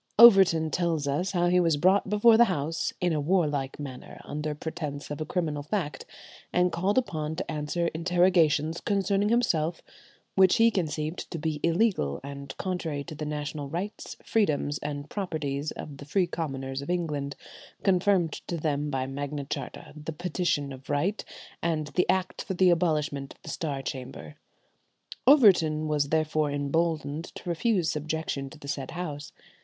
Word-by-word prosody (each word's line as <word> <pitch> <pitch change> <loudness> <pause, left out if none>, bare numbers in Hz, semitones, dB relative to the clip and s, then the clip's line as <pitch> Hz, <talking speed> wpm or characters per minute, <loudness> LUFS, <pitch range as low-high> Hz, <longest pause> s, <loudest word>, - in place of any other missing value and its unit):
Overton 190 -8 +8
tells 165 -5 0
us 150 +7 0
how 175 -1 +2
he 180 +1 +4
was 165 -4 +3
brought 190 +5 +3
before 210 +3 +6
that 235 +1 +7
House 165 -5 -1
"in 175 -2 +1
a 150 - 0
warlike 145 -5 0
manner, 135 -3 -8
under 150 0 -3
pretence 150 -2 -5
of 145 - -4
a 155 - -3
criminal 155 -5 -1
fact, 150 0 -3 0.4
and 180 0 +3
called 185 +7 0
upon 160 -10 -1
to 175 0 -4
answer 155 +3 -1
interrogations 170 -2 +2
concerning 200 0 +1
himself 170 -9 +1 0.5
which 190 -1 +5
he 230 0 +5
conceived 155 -3 -2
to 170 - -4
be 155 -1 -2
illegal 170 - +1
and 140 0 -8
contrary 165 -6 -3
to 160 - -8
the 150 0 -5
national 150 -1 -4
rights, 185 +7 -5
freedoms, 150 -8 +1
and 145 -1 -5
properties 155 -7 -3
of 145 -2 -8
the 140 - -10
free 180 +6 +2
commoners 135 -5 -4
of 140 - -8
England, 150 -5 -2 0.5
confirmed 185 -3 +3
to 170 - -2
them 150 -2 -1
by 135 -2 -1
Magna 140 +1 -4
Charta, - - -6
the 150 +1 -6
Petition 155 -4 -1
of 130 0 -13
Right, 170 +9 0 0.4
and 155 -3 -1
the 180 - 0
Act 185 0 0
for 190 - -4
the 185 0 +5
Abolishment 150 -5 0
of - - -32
the - - -8
Star 140 -4 -3
Chamber." 125 - -6 0.9
Overton 175 - +6
was 145 -2 +1
therefore 155 -1 +1
emboldened 155 +2 -1
to - - -10
refuse 175 0 +1
subjection 150 -2 -3
to 155 - -13
the 140 - -11
said 140 -1 -3
House. 150 -5 -5
155 Hz, 160 wpm, -28 LUFS, 145-180 Hz, 0.9 s, Overton